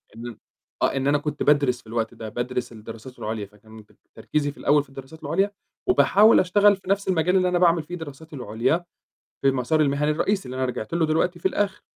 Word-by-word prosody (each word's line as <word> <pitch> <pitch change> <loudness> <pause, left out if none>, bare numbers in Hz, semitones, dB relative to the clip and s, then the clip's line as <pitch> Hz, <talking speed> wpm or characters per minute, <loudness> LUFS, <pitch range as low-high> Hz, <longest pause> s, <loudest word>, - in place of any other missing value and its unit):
إن 115 - -9
أنا 120 -3 -8 0.4
آه، - - +2
إن 135 0 0
أنا 145 +1 +4
كنت 145 0 -3
بادرس 140 -4 +3
في - - -22
الوقت 115 0 -2
ده، 110 -1 -7
بادرس 120 +2 -3
الدراسات 115 +3 -11
العُليا، 110 -1 -4
فكان 110 +2 -16
بب 105 - -24 0.2
تركيزي 145 -1 -1
في - - -20
الأول 145 0 +3
في 145 - -23
الدراسات 135 +4 -12
العُليا، 190 +7 +1 0.4
وباحاول 220 - +5
أشتغل 205 +3 +4
في 190 -1 -13
نَفْس 200 0 +1
المجال 180 0 +2
اللي 185 -1 +2
أنا 180 -1 +1
باعمل 170 -2 +4
فيه 175 +4 -7
دراساتي 160 -1 -9
العُليا، 125 +7 -1 0.6
في 135 - +4
المسار 135 +4 +1
المِهني 150 0 +1
الرئيسي 195 +6 0
اللي 125 +1 -6
أنا 130 - 0
رِجعت 125 -4 -4
له 170 -2 +2
دلوقتي 165 +3 0
في 180 - +1
الآخِر، 200 0 -2
145 Hz, 215 wpm, -24 LUFS, 125-175 Hz, 0.6 s, وباحاول